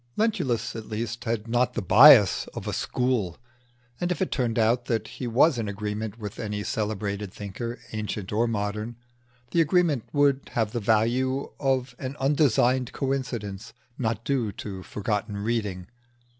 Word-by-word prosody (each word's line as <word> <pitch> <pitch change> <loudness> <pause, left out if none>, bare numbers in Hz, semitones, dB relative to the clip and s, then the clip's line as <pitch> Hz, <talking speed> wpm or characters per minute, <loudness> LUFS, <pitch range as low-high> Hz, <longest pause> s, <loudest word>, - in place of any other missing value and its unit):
Lentulus 155 - 0
at 110 -1 -7
least 115 +2 -4
had 115 -1 -2
not 120 +1 +1
the 120 - -1
bias 105 - +7
of - - -6
a - - -2
school; 125 -9 -1 0.6
and 175 0 -1
if 180 - -1
it 190 - -1
turned 120 -4 0
out 120 +2 +2
that 115 -3 -1
he 125 - -6
was 125 +3 +4
in 110 -2 -2
agreement 105 +1 -4
with 105 -3 -7
any 105 -2 -3
celebrated 105 -2 -3
thinker, 110 +5 -6 0.2
ancient 105 -2 -4
or 115 +3 +2
modern, 105 +1 -3 0.6
the 170 - +4
agreement 165 - +2
would 140 -2 +2
have 110 -3 0
the 120 - -2
value 120 +5 +1
of 130 -2 0
an 130 0 -5
undesigned 130 -3 +2
coincidence 120 -6 -3 0.2
not 115 -2 -2
due 125 -6 0
to 95 -2 -7
forgotten 105 +1 -3
reading. 105 -4 -2
115 Hz, 155 wpm, -26 LUFS, 105-130 Hz, 0.6 s, bias